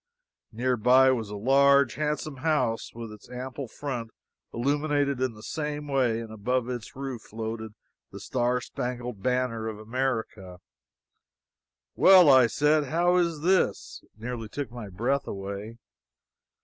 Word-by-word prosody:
Nearby 125 +2 +4
was 115 -5 -2
a 105 - -6
large, 140 +3 +4
handsome 150 -1 -3
house 135 -6 0
with 115 -2 -7
its 105 -1 -14
ample 125 +1 -6
front 120 -2 -5 0.4
illuminated 140 +1 0
in 130 -2 0
the 105 - -13
same 150 +1 -4
way, 130 -5 +1
and 115 -1 -8
above 125 +3 -1
its 120 -3 -6
roof 135 -3 -5
floated 110 0 -6 0.4
the - - -9
Star 125 0 0
Spangled 125 -4 -5
Banner 125 -2 -1
of 110 -1 -5
America. 110 -5 -3 1.4
"Well!" 185 -6 +8
I 130 -3 +7
said. 150 +6 +2
"How 175 +5 +2
is 170 -4 0
this?" 185 +3 +1
It - - -27
nearly 115 -1 -5
took 140 0 -5
my 120 -4 -8
breath 125 +9 -1
away. 100 +3 -6
125 Hz, 135 wpm, -27 LUFS, 115-140 Hz, 1.4 s, Well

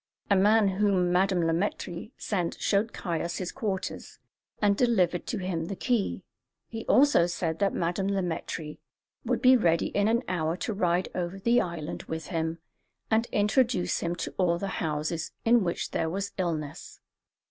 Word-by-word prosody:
A - - +6
man 210 +2 +5
whom 190 -2 +2
Madame 185 -1 +2
Le 165 - +2
Maître 175 +1 -3
sent 180 -5 -2
showed 210 +3 +1
Caius 170 -1 -3
his 185 -2 -3
quarters, 205 -7 -4 0.4
and 205 -1 +3
delivered 190 -8 +2
to 235 - -2
him 180 -4 -2
the 195 - -4
key; 240 -1 -1 0.4
he 225 -1 -7
also 265 -11 +5
said 165 -2 -2
that 200 -1 +2
Madame 175 +3 -1
Le 195 -1 0
Maître 160 -2 -4 0.5
would - - -1
be 255 0 +8
ready 170 -8 +2
in 205 0 +1
an 235 +2 +2
hour 165 -1 -1
to 220 - -3
ride 180 -2 +1
over 180 +1 -3
the 235 +5 +3
island 170 -3 -5
with 160 -1 -5
him 165 -1 -2 0.5
and 225 +2 +3
introduce 210 -1 +1
him 170 0 -2
to 175 - -5
all 170 -2 +3
the 195 +2 -3
houses 155 +1 -2
in 230 -1 +5
which 170 -1 -2
there 160 - 0
was 195 +3 -3
illness. 160 -5 -3
185 Hz, 170 wpm, -28 LUFS, 170-205 Hz, 0.5 s, be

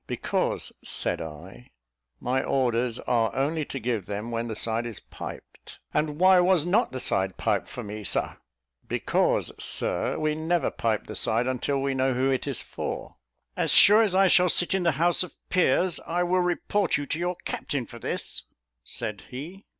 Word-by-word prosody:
"Because," - - -1
said - - 0
I, 85 +9 -10 0.5
"my 130 +2 0
orders 120 -2 +1
are 115 -2 +1
only 150 +3 0
to 135 - -5
give 115 -5 -2
them 105 +3 -4
when 115 0 -2
the 110 - -4
side 115 +2 -1
is 115 - -7
piped." - - -10 0.2
"And 150 -1 0
why 185 0 +7
was 180 -3 +3
not 180 +4 +2
the 130 - -4
side 95 -5 0
piped - - 0
for - - -7
me, 105 +1 -7
Sir?" - - -1 0.5
"Because, - - +1
Sir, - - -1
we 155 -1 0
never 160 +2 0
pipe 110 -2 -1
the - - -7
side 115 +2 +1
until 130 +2 -1
we 135 0 0
know 130 -1 +1
who 130 +2 +2
it 130 +2 -1
is 135 -4 -2
for." - - -6 0.4
"As - - 0
sure 210 +3 +8
as 205 -5 +2
I 195 +1 +5
shall 180 -1 +5
sit 175 +2 +3
in 190 - +1
the 170 -3 +2
House 170 +5 +2
of 180 - -4 0.2
Peers, 180 0 +2
I 175 +2 0
will 180 +1 +2
report 180 +2 +1
you 145 - -4
to 155 +3 -3
your 175 +1 -1
captain 135 -4 -3
for 120 -1 -11
this," - - -3 0.4
said 100 - -5
he. 165 +10 -8
135 Hz, 185 wpm, -26 LUFS, 115-175 Hz, 0.5 s, sure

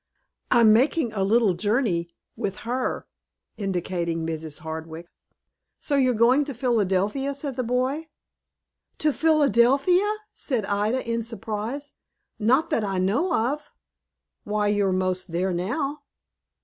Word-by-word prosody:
"I'm 225 -2 +6
making 255 +1 +2
a 195 -3 0
little 215 0 +3
journey 190 -3 0 0.3
with 195 -1 -3
her," 250 +2 -2 0.5
indicating 175 -5 -2
Mrs. 160 -2 -5
Hardwick. 160 +1 -6 0.7
"So 290 - -1
you're 255 -3 +3
going 245 +6 +4
to 280 -3 -6
Philadelphia," 230 +3 0
said 275 -2 -4
the 255 - -1
boy. 255 +6 -1 0.9
"To 300 -1 +1
Philadelphia!" 305 - +3 0.2
said 245 -8 -2
Ida, 210 +6 -1
in 230 0 0
surprise. 230 +5 -5 0.5
"Not 260 +10 +2
that 230 -8 +1
I 195 -2 -2
know 205 - +1
of." 290 +2 -1 0.7
"Why, 210 0 0
you're 205 -2 +2
most 185 -1 -1
there 180 +2 0
now." 275 - -2
225 Hz, 125 wpm, -25 LUFS, 190-270 Hz, 0.9 s, I'm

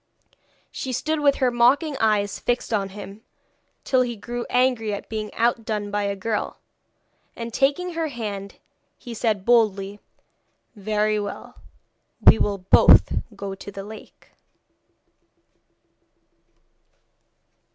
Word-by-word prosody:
She 260 - -5
stood 310 +5 -1
with 285 -1 +3
her 255 -2 +1
mocking 270 +6 +3
eyes 210 -2 +1
fixed 245 -1 -1
on 200 -2 0
him, 200 +1 -10 0.6
till 260 -1 +2
he 240 -2 -1
grew 240 +3 -6
angry 245 -4 +1
at - - -9
being 215 -1 -4
outdone 220 -3 -1
by 205 0 -1
a 200 0 -1
girl, 210 +2 -3 0.8
and 230 -1 -6
taking 315 +8 +1
her 325 -1 -1
hand 210 -7 -6 0.4
he 240 - -9
said 215 -4 -1
boldly: 205 -4 +2 0.8
'Very 215 +1 0
well, 205 -1 -7 0.6
we - - +7
will 205 -1 0
both 185 0 +6 0.2
go 200 -1 -5
to 195 +1 -9
the 195 0 -7
lake.' 215 +2 -13
220 Hz, 120 wpm, -23 LUFS, 205-245 Hz, 0.8 s, we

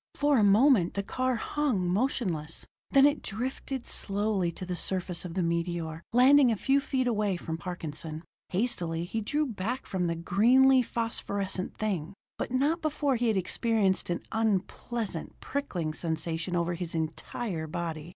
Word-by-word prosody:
For 290 -3 +3
a - - +4
moment 205 -2 +5
the 200 - -1
car 255 +5 -1
hung 235 -6 0
motionless, 180 - -1 0.2
then 275 0 +6
it 290 +1 +3
drifted 255 +4 -4
slowly 200 -3 +1
to 185 - -6
the 180 0 -3
surface 180 -1 -2
of 170 -1 -6
the 185 - +1
meteor, 170 -1 -2
landing 255 +2 +6
a - - +1
few 270 +7 +2
feet 265 -2 -1
away 210 -5 +1
from 165 -1 -5
Parkinson. 160 -3 -6 0.3
Hastily 180 -5 0
he 220 +6 -3
drew 295 +8 0
back 240 +1 -3
from 180 -2 -1
the 170 - -1
greenly 250 +10 +5
phosphorescent 200 -5 -2
thing 195 -4 -2 0.2
but - - -2
not 285 +7 +1
before 295 -3 0
he 240 0 0
had 220 -3 +2
experienced 195 +1 +1
an 175 - -2
unpleasant 220 -2 -2
prickling 180 - -3
sensation 165 +2 -3
over 170 0 0
his 170 -1 -5
entire 160 +2 -3
body. 165 -1 -4
195 Hz, 155 wpm, -29 LUFS, 170-245 Hz, 0.3 s, then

